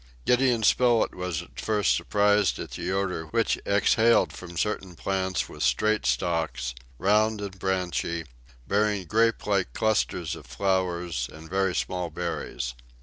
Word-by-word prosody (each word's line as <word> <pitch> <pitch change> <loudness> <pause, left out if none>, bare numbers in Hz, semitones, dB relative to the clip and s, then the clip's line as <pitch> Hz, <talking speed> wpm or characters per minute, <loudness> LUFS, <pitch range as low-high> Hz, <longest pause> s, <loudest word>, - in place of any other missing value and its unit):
Gideon 125 -2 +3
Spilett 120 0 +3
was 90 -4 -3
at - - -13
first 105 -2 +2
surprised 105 -1 +2
at - - -7
the 90 - -3
odor 95 -4 -1
which 115 +8 +1
exhaled 110 +3 +4
from 85 -1 -9
certain 95 -3 -2
plants 95 +1 -1
with - - -10
straight 70 - +2
stalks, 65 -2 -1 0.2
round 105 - +2
and 100 -2 -6
branchy, 90 -3 -1 0.4
bearing 105 -2 +1
grape 115 +5 +2
like 100 -3 0
clusters 105 -6 0
of - - -12
flowers 90 -3 -1
and 80 +1 -11
very 95 -1 +1
small 90 -2 -2
berries. 85 -7 -4
95 Hz, 140 wpm, -26 LUFS, 85-105 Hz, 0.4 s, exhaled